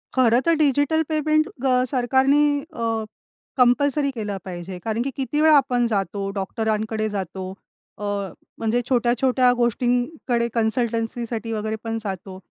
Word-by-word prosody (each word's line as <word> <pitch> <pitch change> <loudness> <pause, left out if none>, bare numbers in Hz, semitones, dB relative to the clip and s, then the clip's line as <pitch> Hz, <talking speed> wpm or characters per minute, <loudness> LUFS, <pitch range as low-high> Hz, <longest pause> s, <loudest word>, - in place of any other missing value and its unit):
खरं 245 -2 +4
तर 335 - +4
digital 290 +2 +2
payment 310 0 +2 0.2
ग 260 - +4 0.2
सरकारनी 265 +3 +3 0.3
अ, 225 -1 -1 0.5
कंपल्सरी 280 +3 +3
केलं 210 -5 -4
पाहिजे. 180 0 -6
कारण 225 +1 -1
की 275 - -3
किती 275 +3 -1
वेळ 315 0 +6
आपण 250 -4 +3
जातो, 200 -2 -2
डॉक्टरांकडे 215 +2 -1
जातो, 190 -2 -4 0.5
अ, 210 - -8 0.5
म्हणजे 230 +2 0
छोट्या-छोट्या 250 +1 +3
गोष्टींकडे 245 +1 0
कन्सल्टंसीसाठी 230 0 -1
वगैरे 215 0 -2
पण 225 0 -2
जातो. 190 -1 -5
240 Hz, 125 wpm, -23 LUFS, 220-265 Hz, 0.5 s, वेळ